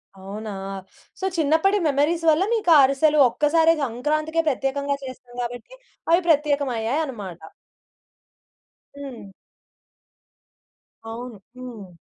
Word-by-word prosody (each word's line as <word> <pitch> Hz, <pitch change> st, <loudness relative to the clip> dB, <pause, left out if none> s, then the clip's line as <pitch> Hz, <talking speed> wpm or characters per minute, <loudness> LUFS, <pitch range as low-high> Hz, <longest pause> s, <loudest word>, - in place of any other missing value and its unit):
అవునా! 200 Hz, +3 st, -8 dB, 0.7 s
సో, 380 Hz, -, -3 dB
చిన్నప్పటి 320 Hz, +7 st, +3 dB
మెమోరీస్ 300 Hz, +4 st, +1 dB
వల్ల 315 Hz, +4 st, +4 dB
మీకా 385 Hz, -7 st, +3 dB
అరిసెలు 295 Hz, +3 st, +3 dB
ఒక్కసారే 325 Hz, +5 st, +3 dB
సంక్రాంతికే 305 Hz, +7 st, -1 dB
ప్రత్యేకంగా 280 Hz, +1 st, -1 dB
చేస్తాం 255 Hz, -1 st, -10 dB
గాబట్టి, 245 Hz, -, -6 dB, 0.4 s
అవి 345 Hz, +2 st, +5 dB
ప్రత్యేకమయ్యాయి 285 Hz, -3 st, +1 dB
అన్నమాట. 200 Hz, -, -8 dB, 1.6 s
హ్మ్. 265 Hz, -7 st, -9 dB, 1.8 s
అవును. 235 Hz, -2 st, -8 dB, 0.2 s
హ్మ్. 220 Hz, -9 st, -10 dB
280 Hz, 90 wpm, -23 LUFS, 240-310 Hz, 1.8 s, అవి